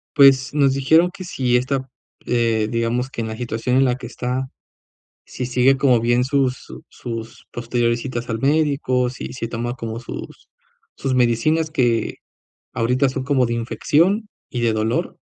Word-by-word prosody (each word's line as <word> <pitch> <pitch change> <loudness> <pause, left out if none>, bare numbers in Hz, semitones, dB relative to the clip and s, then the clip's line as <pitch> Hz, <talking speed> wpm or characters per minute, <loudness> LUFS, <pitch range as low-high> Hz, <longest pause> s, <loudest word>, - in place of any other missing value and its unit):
Pues 135 -1 +6
nos 140 -2 +3
dijeron 160 +6 +4
que 185 - -8
sí 130 -8 0
está 130 +2 0 0.4
eh, 115 -3 +1
digamos 115 +2 -1
que 120 - -5
en 110 - -3
la 110 0 -6
situación 120 +1 -1
en 135 - +5
la 125 -1 +2
que 125 -2 -8
está, 130 +2 -3 0.8
si 125 - -5
sigue 125 +2 +3
como 130 -3 +4
bien 120 +2 +2
sus 135 -1 +1
su - - -12
sus 115 -2 -8
posteriores 120 0 0
citas 120 -2 -5
al 115 -1 -2
médico, 140 -3 +1
si 130 - -7
se 120 -3 -4
toma 120 +1 -3
como 115 -2 -5
sus 120 - -9 0.5
sus 135 - -2
medicinas, 130 +7 +2
que 120 -7 +1 0.6
ahorita 125 +4 +2
son 130 0 -4
como 135 -2 +2
de 120 - -2
infección 170 - +1 0.2
y 120 - -3
de 115 -1 +2
dolor. 110 +2 -1
125 Hz, 170 wpm, -21 LUFS, 115-135 Hz, 0.8 s, Pues